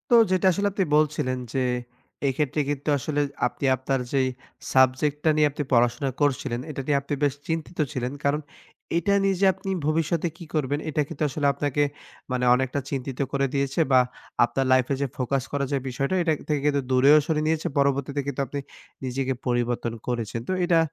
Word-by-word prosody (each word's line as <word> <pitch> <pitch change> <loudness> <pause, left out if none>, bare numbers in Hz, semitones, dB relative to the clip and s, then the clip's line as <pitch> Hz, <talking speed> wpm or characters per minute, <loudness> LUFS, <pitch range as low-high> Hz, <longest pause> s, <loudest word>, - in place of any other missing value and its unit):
তো - - +8 0.2
যেটা 185 0 +3
আসলে 200 +3 0
আপনি 195 -1 +1
বলছিলেন 150 -4 +1 0.2
যে, 135 - +1 0.7
এক্ষেত্রে 145 +2 0
কিন্তু 145 +1 -2
আসলে 145 +2 -1 0.3
আপনি - - -5
আপনার 130 +1 -1
যেই 135 -1 +3 0.5
সাবজেক্ট 130 +3 +3
টা - - +5
নিয়ে 155 -1 +4
আপনি 145 +1 -3
পড়াশোনা 120 +3 +3
করছিলেন, 135 -4 +1
এটা 140 -2 -4
নিয়ে 145 -2 +3
আপনি 140 - -5
বেশ 145 -2 +3
চিন্তিত 165 +1 -3
ছিলেন। 125 -3 -2
কারণ 145 +2 +1 0.6
এটা 185 +4 +2
নিয়ে 195 -1 +2
যে - - +5
আপনি 195 - -7 0.2
ভবিষ্যতে 165 +2 +1
কি 170 - -9
করবেন, 145 -2 0
এটা 155 0 +1
কিন্তু 145 - -4
আসলে 145 +2 -2
আপনাকে 145 0 0 0.5
মানে 125 0 0
অনেকটা 130 +2 -1
চিন্তিত 135 -2 -4
করে 140 -1 +1
দিয়েছে। 140 +1 0
বা 130 - +7 0.5
আপনার 135 +3 -1
লাইফ 130 -1 +5
এ - - +1
যে 140 - +1
ফোকাস 130 0 0
করার 140 -1 -1
যে - - +3
বিষয়টা 140 +7 -1
এটার 160 -3 +1
থেকে 150 -1 +2
কিন্তু 145 -1 +2
দূরেও 135 +4 +6
সরিয়ে 155 -1 0
নিয়েছে। 160 +1 0
পরবর্তীতে 140 0 +1
কিন্তু 140 0 -2
আপনি 145 - -4 0.5
নিজেকে 130 +1 -1
পরিবর্তন 120 -1 0
করেছেন। 115 -2 -2
তো - - +2
এটা 170 -2 +4
140 Hz, 185 wpm, -25 LUFS, 130-155 Hz, 0.7 s, তো